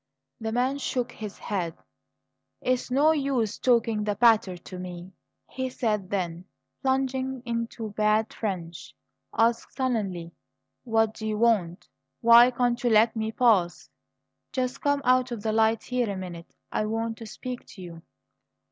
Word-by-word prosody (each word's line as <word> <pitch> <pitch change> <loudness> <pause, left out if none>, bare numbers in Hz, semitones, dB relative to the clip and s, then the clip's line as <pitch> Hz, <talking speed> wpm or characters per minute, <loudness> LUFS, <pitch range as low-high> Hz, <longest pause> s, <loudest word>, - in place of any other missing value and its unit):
The 220 0 -3
man 255 +4 0
shook 250 -3 -2
his 210 -2 -8
head. 180 -6 -3 0.8
"It's 255 0 -1
no 285 +5 +4
use 270 -8 0
talking 230 -4 +2
that 205 -1 -2
patter 220 -6 +4
to 180 +1 -10
me," 180 0 -8 0.4
he 260 0 -4
said; 210 -6 -1
then, 175 -3 -3 0.4
plunging 265 -1 -1
into 230 -2 -3
bad 215 +1 +1
French, 175 -6 -5 0.4
asked 230 +1 +1
sullenly: 200 -10 -2 0.5
"What 225 -2 +2
do 220 - -6
you 215 -1 -1
want? 210 -7 +1 0.3
Why 235 +1 +8
can't 245 -1 0
you 240 - +3
let 225 +1 +4
me 220 0 -2
pass?" 205 -8 +2 0.6
"Just 255 +1 -2
come 285 -1 +1
out 255 0 +4
of 225 -4 -5
the 220 - 0
light 220 0 +2
here 250 -3 -1
a 200 - -3
minute; 175 -3 -8 0.2
I 215 - 0
want 225 +1 -2
to 225 - -8
speak 250 +3 -7
to 190 - -10
you." 170 -2 -10
225 Hz, 150 wpm, -26 LUFS, 200-250 Hz, 0.8 s, Why